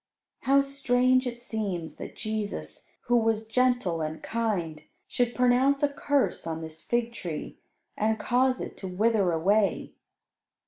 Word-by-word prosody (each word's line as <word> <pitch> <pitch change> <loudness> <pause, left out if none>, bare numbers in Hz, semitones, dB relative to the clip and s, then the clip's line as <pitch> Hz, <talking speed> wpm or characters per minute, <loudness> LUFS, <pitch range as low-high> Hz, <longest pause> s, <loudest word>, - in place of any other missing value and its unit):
How 275 +1 +4
strange 255 -2 +2
it 240 0 -6
seems 195 -8 -4
that - - -8
Jesus, 205 - -4
who 240 - +1
was 225 -1 +1
gentle 245 -8 +1
and 155 0 -4
kind, 190 -9 -2 0.3
should 245 -1 0
pronounce 255 +3 +3
a 290 - +4
curse 285 -10 0
on 160 0 -3
this 160 0 -9
fig 235 0 -1
tree, 170 -9 -6 0.4
and 220 +1 +1
cause 255 +4 +2
it - - -6
to 190 - -6
wither 200 0 +2
away. 195 +5 +1
225 Hz, 140 wpm, -27 LUFS, 180-250 Hz, 0.4 s, How